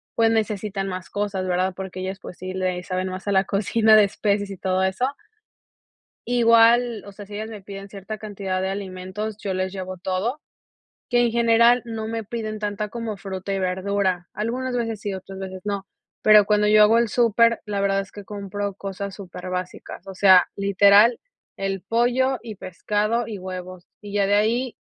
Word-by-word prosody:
pues, 225 -1 +3
necesitan 210 -3 -1
más 185 0 -6
cosas, 200 -2 -2
verdad, 185 +1 0
porque 190 -1 -6
ellas, 190 +1 -4
pues 180 - -10
sí, 185 +1 -5
le 185 -1 -1
saben 185 0 -2
más 185 +2 -7
a - - +1
la 190 -1 +4
cocina 215 +2 +3
de 215 -1 +7
especias 200 0 -1
y 195 - -7
todo 185 0 0
eso 190 +6 0 1.2
igual, 235 -1 +4
o 200 - -9
sea, 205 +1 -10
si 205 - -12
ellas 220 +1 -5
me 210 -3 -8
piden 195 0 -9
cierta 200 +2 -7
cantidad 195 -3 -4
de 190 - -1
alimentos, 195 +2 -5
yo 195 -3 -3
les 185 0 -2
llevo 185 -1 -6
todo, 190 +10 -2 0.7
que 240 -1 +3
en 235 - +2
general 235 +1 +4
no 225 -2 -5
me 225 -1 -3
piden 215 0 -4
tanta 210 0 -3
como 230 -1 -5
fruta 195 -1 -5
y - - -1
verdura, 185 -1 -1
algunas 245 +4 -2
veces 225 -3 -2
sí, 205 -2 -3
otras 190 0 -8
veces 190 -1 -6
no, 200 -1 -3 0.4
pero 210 -1 +7
cuando 210 0 +2
yo 210 0 +6
hago 225 +2 +6
el 235 - +2
súper, 230 0 +3
la 205 -1 -2
verdad 195 0 +2
es 195 - -9
que 205 -1 -10
compro 200 -1 -4
cosas 195 0 -6
súper 185 -2 -9
básicas, 180 0 -6
o 195 - -8
sea, 185 -1 +6
literal 200 +3 +5 0.4
el 195 -1 -3
pollo 245 +3 +1
y 225 -2 -7
pescado 210 +5 -1
y 215 -3 -6
huevos, 185 -1 -8
y 205 -1 -9
ya 200 -1 +2
de 200 - +2
ahí 230 +4 +1
200 Hz, 190 wpm, -23 LUFS, 190-220 Hz, 1.2 s, de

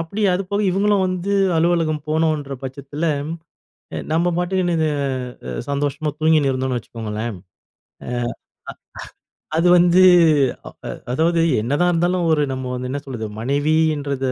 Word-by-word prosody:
அப்படி 165 +6 -5
அது 180 +2 0
போக 205 0 0
இவுங்களும் 200 +1 +2
வந்து 185 +2 -2 0.2
அலுவலகம் 160 -2 +1
போனும்ன்ற 155 -3 0
பட்சத்தில, 140 +4 -5 0.9
அ - - -3
நம்ம 165 +2 +2
பாட்டுன்னு 180 0 0
இது 160 -1 +2 0.6
அ - - -4 0.2
சந்தோஷமா 145 +2 -1
தூங்கின்னு 155 -3 +3
இருந்தோம்ன்னு 130 -1 -1
வச்சுக்கோங்களேன், 110 -2 -5 0.7
அ - - -4 1.5
அது 165 +2 +3
வந்து 175 +1 +5 0.6
அ - - -6 0.2
அ - - -4 0.2
அதாவது, 165 +5 +2 0.2
என்னதான் 145 +10 +1
இருந்தாலும் 175 +1 +1
ஒரு 150 -2 +3
நம்ம 130 0 -5
வந்து 125 0 -4
என்ன 145 +1 -3
சொல்றது, 120 -5 -5
மனைவின்றதை 145 0 0
155 Hz, 130 wpm, -20 LUFS, 135-175 Hz, 1.5 s, வந்து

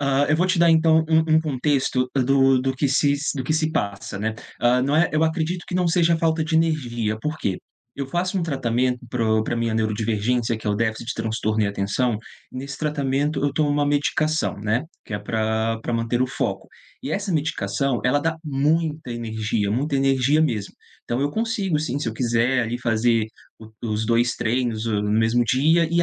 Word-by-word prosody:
Hã, 140 0 +2
eu 155 - +3
vou 180 +3 +2
te 185 -2 +1
dar, 170 0 +5
então, 160 0 +4
um 160 0 +3
um - - +4
contexto 130 -3 0
do 135 0 +3
do 130 +1 -1
que 140 +2 0
se 140 +1 +3 0.2
do 130 - -3
que 155 - 0
se 155 0 +1
passa, 100 -6 -3
né. 110 +1 -2 0.3
Ah, 125 +1 +3
não 140 +3 +1
é 170 +1 +4
eu 155 - +2
acredito 160 +2 -1
que - - -6
não 180 -1 +1
seja 170 -1 +3
falta 160 0 +1
de 160 0 0
energia. 120 -9 0
Por 150 +5 -3
quê? 95 -2 -2 0.4
Eu 140 -1 -4
faço 180 +6 -1
um - - -1
tratamento 125 -4 0
pro 110 -2 +1
pra 120 - -2
minha 115 -1 -1
neurodivergência, 110 +2 0
que 110 - -10
é - - +2
o 105 - +1
déficit 110 +1 -2
de - - -2
transtorno 110 -1 -1
e - - +2
atenção. 100 +3 -1 0.3
Nesse 140 +2 -7
tratamento, 145 0 -1
eu 145 - +1
tomo 150 0 +1
uma 145 0 +1
medicação, 155 +1 0
né, 110 +5 0 0.2
que 105 - -6
é - - -2
pra 110 +1 -1
pra 120 - -3
manter 115 +1 0
o - - +1
foco. 125 - -3 0.4
E 135 - -4
essa 200 +3 -2
medicação, 140 -4 -1
ela 130 +3 +3
dá 160 +2 -1
muita 150 0 0
energia, 110 -2 -2
muita 140 +7 -1
energia 135 +2 +2
mesmo. 110 -10 -1 0.3
Então 120 +2 -2
eu 145 +1 0
consigo, 210 -6 0
sim, 140 -3 -2
se 145 - -2
eu 110 - -5
quiser 120 +1 +1 0.2
fazer 115 -1 +2 0.3
o 110 -1 -12 0.2
os 110 +1 -1
2 120 +1 +2
treinos 115 -1 -1
no 105 -2 0
mesmo 115 +2 +2
dia. 155 +8 +3
E 170 0 +3
130 Hz, 200 wpm, -23 LUFS, 115-155 Hz, 0.4 s, dar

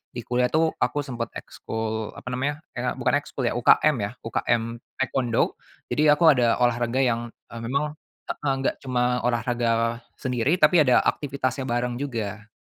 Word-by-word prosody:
di 120 - -4
kuliah 125 0 +2
itu 160 0 +2
aku 145 - +1
sempat 120 -4 -4
ekskul 110 -1 -4
apa - - -12
namanya, 145 +5 -2
kayak 125 +1 -2
bukan 130 - +1
ekskul 135 - -6
ya, - - -2
UKM 135 +5 +4
ya. 100 +1 -2
UKM, 115 0 -1 0.2
taekwondo, 130 -3 0 0.4
jadi 150 0 +5
aku 170 - +3
ada 120 -4 +3
olahraga 120 +1 +1
yang, 120 -1 0 0.2
eh, 115 - -6
memang 140 +6 -1 0.3
heeh, 140 -2 -1
enggak 135 - 0
cuma 125 -1 0
olahraga 115 -1 0 0.2
sendiri 130 +6 0
tapi 175 -2 +5
ada 125 -3 +5
aktivitasnya 135 -2 -1
bareng 120 0 -1
juga. 110 -6 -4
125 Hz, 155 wpm, -25 LUFS, 115-135 Hz, 0.4 s, jadi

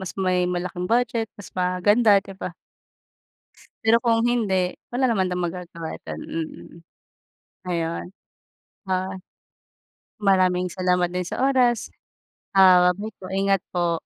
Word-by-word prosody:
mas 190 - -7
may 185 -2 +1
malaking 180 0 -3
budget 230 -1 +1
mas 205 - -12
maganda, 200 +4 +3
'di 195 - -9
ba? 175 - -5 1.3
Pero 225 +1 +6
kung 230 -1 +3
hindi, 190 -7 0 0.2
wala 255 +1 +2
naman 190 -5 +1
din 180 - -2
magagawa 170 -2 -5
dun, 80 -1 -6
mm. 165 -1 -6 0.9
Ayun, 170 -1 -2 0.8
ah, 185 0 -1 1.1
maraming 185 -3 +2
salamat 180 -1 +1
din 180 0 -2
sa - - -5
oras. 250 -4 +2 0.6
Ah, 185 -2 +7
bye 210 +4 -6
po 185 - -9
ingat 195 -1 +2
po. 170 -1 +1
185 Hz, 125 wpm, -23 LUFS, 180-210 Hz, 1.3 s, Ah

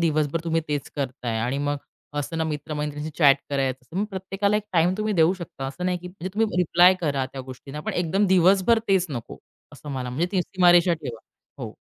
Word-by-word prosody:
दिवसभर 155 -1 +1
तुम्ही 165 -1 +1
तेच 145 -2 -3
करताय 125 -4 -3
आणि 125 +4 -1
मग 145 - 0 0.4
असंना 160 +2 -2
मित्रमैत्रिणींशी 150 0 -4
चॅट 140 -3 +7
करायचं. 135 +2 -2
मग 205 - +1
प्रत्येकाला 195 +2 -1
एक 210 - -1
टाईम 175 +1 +3
तुम्ही 215 -1 0
देऊ 165 +3 +5
शकता 165 -6 -7
असं 180 +7 -6
नाही, 180 -1 0
की 180 +1 -9
म्हणजे 185 0 -7
तुम्ही 220 -4 +1
रिप्लाय 180 +1 +6
करा 140 -5 0
त्या 135 - -5
गोष्टींना, 130 +3 -9
पण - - -4
एकदम 185 +4 +1
दिवसभर 190 +5 +4
तेच 190 -2 +3
नको 120 -4 -6 0.3
असं 150 - -12
मला 130 -2 -3
म्हणजे 160 +8 0
ती 185 -2 +2
सीमारेषा 175 -1 +4
ठेवा. 130 -8 -7 0.4
हो. - - -6
160 Hz, 190 wpm, -24 LUFS, 140-180 Hz, 0.4 s, चॅट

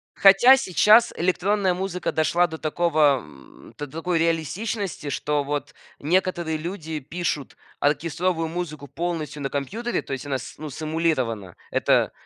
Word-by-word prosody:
Хотя 200 +7 +7
сейчас 215 +1 +5
электронная 185 +2 +1
музыка 180 -1 -3
дошла 170 +3 +2
до 160 -1 -7
такого 155 -3 +2
м, 70 - -16
до 145 - -5
такой 165 +4 -2
реалистичности, 165 +2 -2
что 145 +1 -1
вот 145 +1 -4 0.3
некоторые 170 0 0
люди 160 -2 -5
пишут 150 0 -4 0.2
оркестровую 165 +3 0
музыку 155 -4 -5
полностью 160 0 -4
на 135 - -2
компьютере, 220 - -2
то - - -11
есть 135 - -5
она, 140 -2 -1
с - - -9
ну, 155 0 -6
сэмулирована. 140 - -2 0.2
Это, - - +2
160 Hz, 135 wpm, -24 LUFS, 145-180 Hz, 0.3 s, Хотя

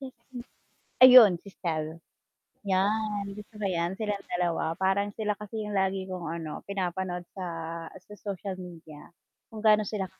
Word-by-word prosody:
Mm, 265 -1 -7 0.9
ayun 250 -6 +11
si 200 - -12
Stell, 160 -1 -3 0.7
yan 205 +2 +1
gusto 210 +1 -11
ko 210 - -3
yan 175 -1 0
silang 210 -2 -2
dalawa, 170 -2 0
parang 195 +2 +1
sila 210 -1 0
kasi 215 +1 -5
yung 210 - -5
lagi 190 -1 0
kong 180 -3 -5
ano 160 -2 -6
pinapanood 185 -2 -3
sa, 190 -2 -5 0.5
sa 195 +3 -13
social 195 -1 -5
media 165 -4 -11 0.4
kung 220 -1 -9
gaano 215 0 +6
sila 205 -3 -2
195 Hz, 145 wpm, -28 LUFS, 175-210 Hz, 0.9 s, ayun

